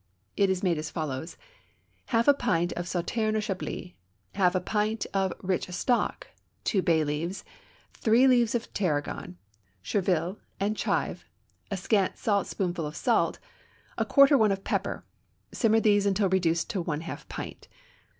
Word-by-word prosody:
It 200 Hz, -1 st, +3 dB
is 190 Hz, 0 st, -1 dB
made 170 Hz, -4 st, +2 dB
as 155 Hz, -, -4 dB
follows: 155 Hz, 0 st, -4 dB, 0.7 s
Half 230 Hz, -1 st, +1 dB
a 285 Hz, -, +8 dB
pint 175 Hz, -10 st, 0 dB
of 175 Hz, 0 st, -4 dB
Sauterne 215 Hz, +5 st, -1 dB
or -, -, +2 dB
Chablis, 190 Hz, -3 st, -4 dB, 0.4 s
half 185 Hz, -2 st, +2 dB
a -, -, +3 dB
pint 210 Hz, +3 st, -1 dB
of 195 Hz, -1 st, +1 dB
rich 185 Hz, 0 st, -1 dB
stock, 240 Hz, +7 st, 0 dB, 0.4 s
two 195 Hz, -, +1 dB
bay 165 Hz, -3 st, +3 dB
leaves, 155 Hz, +6 st, -3 dB, 0.5 s
three 235 Hz, +4 st, +4 dB
leaves 240 Hz, -3 st, +4 dB
of 235 Hz, -, -3 dB
tarragon, 145 Hz, -, -2 dB, 0.5 s
chervil, 185 Hz, -, 0 dB, 0.2 s
and 205 Hz, +2 st, 0 dB
chive, -, -, -1 dB, 0.4 s
a 200 Hz, -, -2 dB
scant 195 Hz, +1 st, +1 dB
saltspoonful 190 Hz, -5 st, -1 dB
of 150 Hz, -, -8 dB
salt, -, -, +1 dB, 0.6 s
a -, -, +1 dB
quarter 275 Hz, -1 st, +6 dB
one 215 Hz, -2 st, +4 dB
of 195 Hz, 0 st, -2 dB
pepper; -, -, -2 dB, 0.5 s
simmer 225 Hz, -2 st, +3 dB
these 205 Hz, -2 st, +3 dB
until 195 Hz, 0 st, +2 dB
reduced 170 Hz, -3 st, +1 dB
to 195 Hz, -5 st, -1 dB
one 160 Hz, -2 st, -3 dB
half 165 Hz, -, -8 dB
pint. -, -, -7 dB
190 Hz, 150 wpm, -28 LUFS, 175-215 Hz, 0.7 s, a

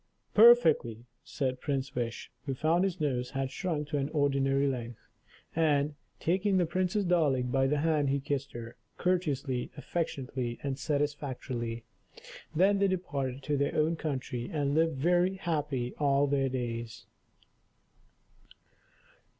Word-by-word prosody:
"Perfectly," 160 Hz, -, +6 dB, 0.2 s
said 130 Hz, -2 st, -3 dB
Prince 140 Hz, -2 st, -2 dB
Wish, 120 Hz, -2 st, -4 dB, 0.2 s
who 135 Hz, -, -1 dB
found 165 Hz, +6 st, +2 dB
his 185 Hz, -2 st, -1 dB
nose 125 Hz, -5 st, -1 dB
had 135 Hz, -1 st, -3 dB
shrunk 155 Hz, -3 st, -2 dB
to 150 Hz, -2 st, 0 dB
an 140 Hz, +1 st, -1 dB
ordinary 140 Hz, -2 st, +2 dB
length. 120 Hz, -4 st, -3 dB, 0.6 s
And, 150 Hz, -2 st, +2 dB, 0.3 s
taking 190 Hz, +3 st, +1 dB
the 180 Hz, -, +3 dB
Princess 185 Hz, +4 st, 0 dB
Darling 145 Hz, -8 st, +2 dB
by 135 Hz, 0 st, +3 dB
the 150 Hz, +2 st, +1 dB
hand, 155 Hz, -3 st, +2 dB
he 140 Hz, +1 st, +1 dB
kissed 140 Hz, 0 st, -3 dB
her, 120 Hz, +1 st, -8 dB, 0.2 s
courteously, 145 Hz, -8 st, 0 dB
affectionately, 130 Hz, -5 st, -3 dB
and 140 Hz, -1 st, -2 dB
satisfactorily. 130 Hz, -6 st, -2 dB, 0.7 s
Then 195 Hz, +4 st, +4 dB
they 200 Hz, -, +4 dB
departed 140 Hz, -8 st, -2 dB
to 145 Hz, 0 st, 0 dB
their 140 Hz, +1 st, 0 dB
own 155 Hz, +2 st, +2 dB
country, 135 Hz, -6 st, -4 dB
and 145 Hz, -3 st, 0 dB
lived 160 Hz, -1 st, +2 dB
very 175 Hz, +5 st, +2 dB
happy 150 Hz, -9 st, -2 dB
all 140 Hz, -1 st, +3 dB
their 135 Hz, -1 st, +1 dB
days. 120 Hz, -3 st, -4 dB
140 Hz, 135 wpm, -30 LUFS, 130-165 Hz, 0.7 s, Perfectly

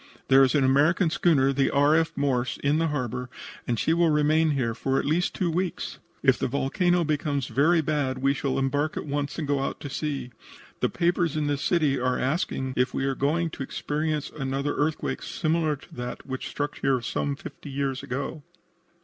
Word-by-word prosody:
There 135 Hz, 0 st, +7 dB
is 130 Hz, +1 st, +3 dB
an 145 Hz, -, +4 dB
American 155 Hz, +6 st, +3 dB
schooner, 140 Hz, -6 st, +3 dB
the 135 Hz, 0 st, +2 dB
R. 145 Hz, +2 st, +4 dB
F. 165 Hz, 0 st, +2 dB
Morse, 130 Hz, -3 st, 0 dB
in 145 Hz, +2 st, +2 dB
the 165 Hz, -, +2 dB
harbor, 125 Hz, -4 st, -3 dB, 0.4 s
and 120 Hz, -, 0 dB
she 160 Hz, +9 st, +2 dB
will 170 Hz, 0 st, +3 dB
remain 155 Hz, +1 st, +3 dB
here 130 Hz, -6 st, 0 dB
for 135 Hz, +3 st, -1 dB
at -, -, 0 dB
least 165 Hz, +5 st, +1 dB
two 175 Hz, -3 st, 0 dB
weeks. 180 Hz, +1 st, -3 dB, 0.2 s
If -, -, +4 dB
the -, -, 0 dB
volcano 175 Hz, +7 st, +1 dB
becomes 145 Hz, -3 st, -1 dB
very 160 Hz, +6 st, +3 dB
bad 145 Hz, -4 st, -1 dB
we 135 Hz, +1 st, +2 dB
shall 135 Hz, -1 st, -2 dB
embark 145 Hz, +3 st, 0 dB
at -, -, -3 dB
once 145 Hz, -1 st, -3 dB
and 155 Hz, -3 st, -3 dB
go 140 Hz, -1 st, +1 dB
out 135 Hz, -, -3 dB
to 145 Hz, -, -6 dB
sea. 140 Hz, -4 st, -3 dB, 0.5 s
The -, -, +1 dB
papers 170 Hz, -3 st, +1 dB
in 150 Hz, -, 0 dB
this 145 Hz, -1 st, -1 dB
city 150 Hz, -5 st, +2 dB
are 125 Hz, 0 st, +1 dB
asking 130 Hz, -2 st, -1 dB
if 125 Hz, +1 st, +1 dB
we 135 Hz, -, 0 dB
are 135 Hz, -, +1 dB
going 160 Hz, +5 st, 0 dB
to -, -, -8 dB
experience 150 Hz, +2 st, -2 dB
another 140 Hz, 0 st, -2 dB
earthquake 150 Hz, +2 st, -1 dB
similar 160 Hz, -2 st, 0 dB
to 140 Hz, -, -17 dB
that 125 Hz, 0 st, -6 dB
which 130 Hz, -1 st, -5 dB
struck 145 Hz, -1 st, -3 dB
here 135 Hz, -1 st, +2 dB
some 140 Hz, +4 st, -2 dB
fifty 145 Hz, 0 st, -10 dB
years 135 Hz, -1 st, -2 dB
ago." 140 Hz, +4 st, -4 dB
145 Hz, 200 wpm, -26 LUFS, 135-155 Hz, 0.5 s, There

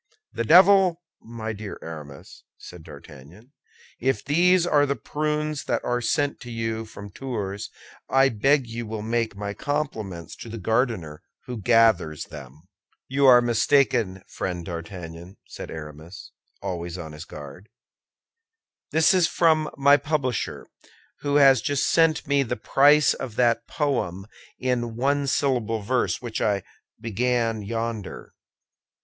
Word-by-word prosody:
"The -, -, -2 dB
devil! 180 Hz, -, +6 dB, 0.2 s
my 110 Hz, -1 st, -6 dB
dear 105 Hz, -1 st, -7 dB
Aramis," 75 Hz, -4 st, -10 dB
said 90 Hz, -2 st, -12 dB
D'Artagnan, 80 Hz, -, -14 dB, 0.5 s
"if 130 Hz, +2 st, -1 dB
these 175 Hz, +4 st, +4 dB
are 145 Hz, -4 st, +3 dB
the 140 Hz, -, 0 dB
prunes 150 Hz, +3 st, -2 dB
that -, -, -1 dB
are 120 Hz, 0 st, -1 dB
sent 145 Hz, +4 st, 0 dB
to 120 Hz, -, -10 dB
you 115 Hz, -1 st, -3 dB
from 100 Hz, -2 st, -11 dB
Tours, 105 Hz, -5 st, -5 dB, 0.4 s
I 135 Hz, 0 st, +4 dB
beg 135 Hz, +4 st, +2 dB
you 115 Hz, 0 st, -6 dB
will 110 Hz, -1 st, -5 dB
make 115 Hz, -1 st, -1 dB
my 100 Hz, 0 st, -4 dB
compliments 110 Hz, -, -4 dB
to 115 Hz, -, -9 dB
the 115 Hz, -, -6 dB
gardener 110 Hz, -, -1 dB, 0.2 s
who 125 Hz, -, -5 dB
gathers 110 Hz, -9 st, +3 dB
them." 70 Hz, +4 st, -12 dB, 0.5 s
"You 140 Hz, +1 st, +3 dB
are 125 Hz, -1 st, +8 dB
mistaken, 120 Hz, -5 st, +2 dB
friend 90 Hz, -3 st, -5 dB
D'Artagnan," 85 Hz, +1 st, -8 dB
said -, -, -9 dB
Aramis, 80 Hz, +3 st, -10 dB, 0.3 s
always 85 Hz, -1 st, -4 dB
on 80 Hz, -3 st, -7 dB
his 75 Hz, 0 st, -9 dB
guard; 75 Hz, +8 st, -11 dB, 1.2 s
"this 160 Hz, +3 st, +4 dB
is 180 Hz, -3 st, +4 dB
from 160 Hz, -2 st, +2 dB
my 140 Hz, +1 st, +6 dB
publisher, 140 Hz, -5 st, -2 dB, 0.5 s
who 145 Hz, -1 st, -1 dB
has 135 Hz, -4 st, +6 dB
just 140 Hz, +3 st, 0 dB
sent 165 Hz, -1 st, +3 dB
me 140 Hz, 0 st, +2 dB
the 125 Hz, -2 st, -2 dB
price 145 Hz, +2 st, +4 dB
of 120 Hz, -5 st, -7 dB
that 120 Hz, -1 st, +2 dB
poem 120 Hz, -, -2 dB, 0.3 s
in 120 Hz, -3 st, -2 dB
one 140 Hz, +3 st, 0 dB
syllable 120 Hz, -6 st, 0 dB
verse 125 Hz, +3 st, 0 dB
which 120 Hz, -2 st, -4 dB
I 100 Hz, -3 st, +1 dB, 0.4 s
began 115 Hz, 0 st, -1 dB
yonder." 115 Hz, -1 st, -5 dB
115 Hz, 135 wpm, -24 LUFS, 95-140 Hz, 1.2 s, are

